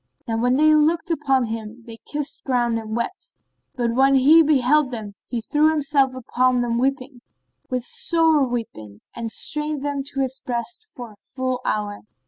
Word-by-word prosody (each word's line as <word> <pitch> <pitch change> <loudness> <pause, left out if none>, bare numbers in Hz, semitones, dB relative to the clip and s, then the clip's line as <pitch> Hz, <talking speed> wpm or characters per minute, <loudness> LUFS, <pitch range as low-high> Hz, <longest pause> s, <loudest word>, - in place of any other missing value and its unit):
Now 225 - -1
when 245 +2 +2
they 310 +1 +5
looked 320 +3 +2
upon 270 -5 +1
him, 225 +1 -7
they 230 -2 -9
kissed 295 -1 -3
ground 240 -3 0
and 220 0 -6
wept; 235 - -5 0.4
but, 235 -2 -1
when 270 +2 +4
he 290 +5 +7
beheld 295 -1 +3
them, 220 -5 -6
he 240 -2 -3
threw 300 +7 +2
himself 285 -4 +1
upon 255 0 +1
them 235 -1 -1
weeping, 265 -1 -2 0.5
with 250 -1 -2
sore 330 - +2
weeping, 110 - -6
and 230 -1 -5
strained 300 +1 -1
them 285 -1 -2
to 275 -1 -3
his 265 0 -2
breast 270 - -4
for 245 -4 -8
a 210 - -19
full 255 +3 -4
hour. 205 -1 -2
255 Hz, 170 wpm, -22 LUFS, 235-295 Hz, 0.5 s, he